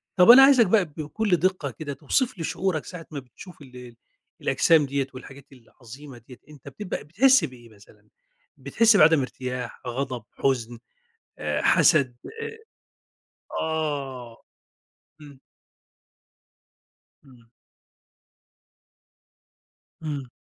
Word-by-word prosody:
طب 180 +1 +5
أنا 270 +2 +9
عايزك 270 -4 +6
بقى 200 0 +3
بكل 160 +6 -2
دقة 180 -5 -1
كده، 140 +5 -7
توصف 195 - -1
لي 165 - -5
شعورك 175 -1 -2
ساعة 175 -3 -10
ما 145 - -5
بتشوف 140 +7 -15
ال 125 -3 -13 0.5
الأجسام 160 -3 +3
دِيَّة 140 -1 -2
والحاجات 135 +1 -12
العظيمة 130 +2 -14
دِيَّة، 125 - -13
أنت 145 -4 -16
بتبقى 205 -3 -6
بتحِس 255 - +3
بإيه 120 -2 -13
مثلًا؟ 105 -2 -21 0.5
بتحِس 225 -2 +3
بعدم 160 -2 +5
ارتياح، 125 -1 -6
غضب، 125 -1 -4
حزن، 120 -3 -2 0.6
آآ - - -2
حسد 135 -7 +3 0.3
آآ 450 0 -7 1.0
آه، 140 -7 -4 0.8
آمم. 145 -3 -15 1.8
آمم. 125 -4 -20 2.5
إمم. 145 -5 -5
145 Hz, 105 wpm, -24 LUFS, 125-175 Hz, 2.5 s, أنا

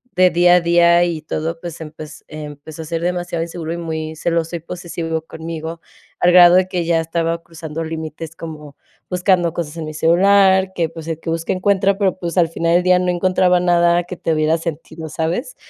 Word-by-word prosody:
de 185 0 +5
día 175 +1 +5
a 180 - +4
día 170 0 +4
y 165 -3 -3
todo, 160 +2 -4
pues, 170 -1 -7
empez 155 0 -10
empezó 150 +1 -9
a - - -10
ser 165 +1 -3
demasiado 175 -1 -2
inseguro 165 -1 -5
y 170 - -4
muy 160 -1 -4
celoso 165 +1 -1
y - - -9
posesivo 165 -1 -5
conmigo. 160 0 -7 0.4
Al 180 - +4
grado 175 0 +8
de 185 0 +4
que 180 -2 -2
ya 165 -1 +2
estaba 165 +1 -2
cruzando 165 -1 -7
límites, 160 0 -6
como 150 -4 -9 0.3
buscando 180 -2 +1
cosas 165 -3 -4
en 160 - -4
mi 155 - -6
celular, 190 +3 +4
que, 165 -2 0
pues, 165 -1 -10
el 160 - -3
que 165 - -6
busca 165 0 -2
encuentra, 195 +1 +1
pero, 190 -3 +1
pues, 170 0 -4
al 170 - +5
final 165 0 0
del 180 - +3
día 180 0 +4
no 180 0 0
encontraba 180 0 +2
nada 175 0 +3
que 180 +1 -8
tuviera 160 0 +1
sentido, 160 -1 -6
¿sabes? 175 - -3
170 Hz, 200 wpm, -19 LUFS, 160-180 Hz, 0.4 s, grado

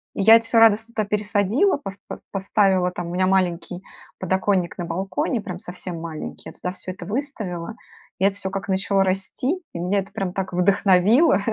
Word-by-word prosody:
И - - -1
я 220 +3 +9
это 230 0 +3
всё 225 0 +3
радостно 225 +1 +4
туда 215 -2 -1
пересадила, 210 - +1
пос 195 -8 -8
пос - - -7
поставила 190 -2 +2
там 175 -1 -5
у 175 - -5
меня 185 0 +2
маленький 180 -1 0 0.4
подоконник 190 -1 0
на 175 - -3
балконе, 190 +7 -2
прям 180 -3 -6
совсем 180 -2 -7
маленький. 160 -2 -7
Я - - -12
туда 180 - -4
всё 185 - -7
это 185 - -9
выставила, 215 -7 -4 0.4
и 190 - +3
это 200 0 +2
всё 190 -1 -4
как 195 +1 -4
начало 195 +1 +2
расти, 195 - -1 0.2
и 170 - -5
меня 190 +3 +1
это 195 +1 -6
прям 195 -3 -3
так 190 -2 -4
вдохновило. 195 - +4
195 Hz, 195 wpm, -22 LUFS, 180-210 Hz, 0.4 s, я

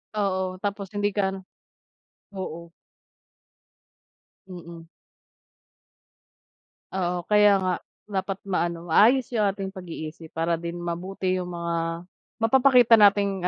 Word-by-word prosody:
Oo. 190 -2 -1
Tapos 200 -1 -4
hindi 205 0 -1
ka 195 -2 +1
ano, 195 - -6 1.0
oo. 170 -3 -7 1.8
Mm. 170 -2 -10 2.1
Oo, 180 -2 -2
kaya 210 -1 +5
nga. 185 -1 +1 0.4
Dapat 195 0 -3
ma-ano, 170 -3 -2
maayos 245 +8 +4
yung 215 -3 +2
ating 195 -1 -3
pag-iisip 165 -3 -9
para 165 0 0
din 170 0 -5
mabuti 175 +2 -3
yung 180 - -5
mga 170 0 -3 0.4
mapapakita 245 -2 +6
nating 200 -2 +3
185 Hz, 100 wpm, -25 LUFS, 170-205 Hz, 2.1 s, mapapakita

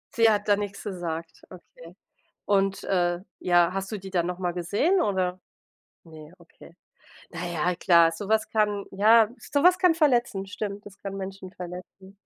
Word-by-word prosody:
Sie 230 -1 +5
hat 210 -1 0
da 205 - +5
nichts 200 -1 -6
gesagt, 170 -4 -6
okay. 170 -1 -15 0.5
Und, 195 -1 +1
äh 175 -2 0 0.2
ja, 175 -1 +3
hast 195 +1 -4
du 210 - -3
die 190 0 -10
dann 175 -2 0
noch 180 0 -4
mal 180 -2 -2
gesehen, 205 - +1
oder? 185 - -1 0.7
Ne, 155 -1 -13
okay. 170 0 -18 0.5
Na 175 +1 -6
ja, 175 +1 -1
klar, 170 -2 +4
so 180 +5 -7
was 220 0 +1
kann 210 -2 0
ja 220 +3 +5 0.2
so 285 - +2
was 360 +1 +6
kann 365 -2 +4
verletzen, 240 - +1
stimmt, 205 0 -6
das 195 - -15
kann 195 -1 -6
Menschen 190 -1 -7
verletzen. 185 +2 -10
190 Hz, 170 wpm, -26 LUFS, 175-205 Hz, 0.7 s, was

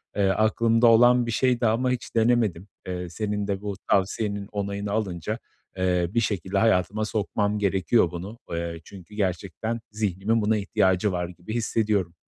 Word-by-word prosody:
Eee, 100 -1 +2
aklımda 115 +3 +3
olan 120 +2 +6
bir 115 - -2
şeydi 125 0 +1
ama 125 +4 +1
hiç 125 -1 -4
denemedim. 110 -6 +2 0.2
Eee, 90 -1 -4
senin 105 +2 -3
de 100 -1 -2
bu 100 -1 -4 0.2
tavsiyenin 100 +1 0
onayını 100 0 -3
alınca, 105 0 -2 0.4
eee, 90 -1 +1
bir 115 - +3
şekilde 100 -3 -1
hayatıma 105 0 +2
sokmam 105 0 -1
gerekiyor 95 -1 +2
bunu. 95 +6 -7
Eee, 85 0 -3
çünkü 95 +3 -13
gerçekten 100 +3 -2
zihnimin 105 +1 0
buna 110 +1 +2
ihtiyacı 95 0 +1
var 90 -1 -2
gibi 90 +4 -8
hissediyorum. 105 -6 0
105 Hz, 150 wpm, -25 LUFS, 95-110 Hz, 0.4 s, olan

